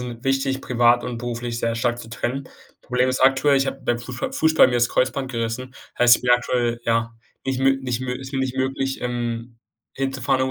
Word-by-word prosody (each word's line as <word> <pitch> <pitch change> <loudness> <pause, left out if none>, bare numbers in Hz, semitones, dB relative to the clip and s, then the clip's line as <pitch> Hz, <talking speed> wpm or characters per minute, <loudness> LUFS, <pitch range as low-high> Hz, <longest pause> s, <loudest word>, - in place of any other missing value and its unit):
'n 120 0 -7
wichtig, 135 0 0
privat 120 0 +3
und 120 -2 -4
beruflich 120 0 -4
sehr 115 0 0
stark 120 0 0
zu 115 - -11
trennen. 130 +3 -4 0.3
Problem 125 0 +1
ist 130 - -1
aktuell, 135 +2 +4
ich 135 0 +1
habe 135 - -4
beim 120 0 +1
Fußball 125 0 -5
Fußball 160 -3 +5
mir 125 - -1
das 120 0 +3
Kreuzband 130 +1 0
gerissen, 120 +2 -4 0.2
heißt, 120 -1 +7
ich - - -13
bin 125 - +1
aktuell 120 -1 +1
ja, 115 0 0 0.3
nicht 135 -1 -1
mö 135 0 +4
nicht 125 -2 -2
mö 130 -1 -3
ist 135 +2 -7
mir 135 - -1
nicht 130 0 -2
möglich, 135 0 -1
ähm, 120 -1 -4 0.4
hinzufahren, 135 -1 0
125 Hz, 205 wpm, -22 LUFS, 120-135 Hz, 0.4 s, heißt